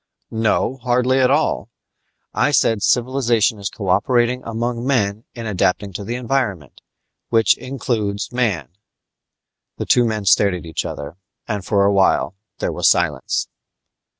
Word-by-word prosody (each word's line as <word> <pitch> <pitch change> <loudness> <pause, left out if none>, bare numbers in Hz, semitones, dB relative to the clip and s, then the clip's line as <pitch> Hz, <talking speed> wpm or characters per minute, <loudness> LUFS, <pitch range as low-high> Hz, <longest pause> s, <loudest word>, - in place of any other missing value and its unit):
"No, 115 +3 0
hardly 125 +1 +1
at 130 -1 +4
all. 140 - +1 0.6
I - - +2
said 115 -6 +2
civilization 120 -3 +2
is 100 - -3
cooperation 120 +6 +1
among 115 +1 -3
men 110 -5 0
in 115 -1 -6
adapting 100 -1 0
to 100 +2 -6
environment 120 - -2 0.5
which 115 -1 +4
includes 110 -6 -3
man." 105 - -1 1.1
The - - -3
two 125 - +4
men 110 -3 -2
stared 100 +1 +4
at 90 - -8
each 80 -2 -4
other, 75 +4 -6 0.3
and 105 -4 -3
for 100 +1 +2
awhile 100 -2 +2 0.2
there - - -2
was - - +3
silence. - - 0
115 Hz, 130 wpm, -20 LUFS, 100-125 Hz, 1.1 s, at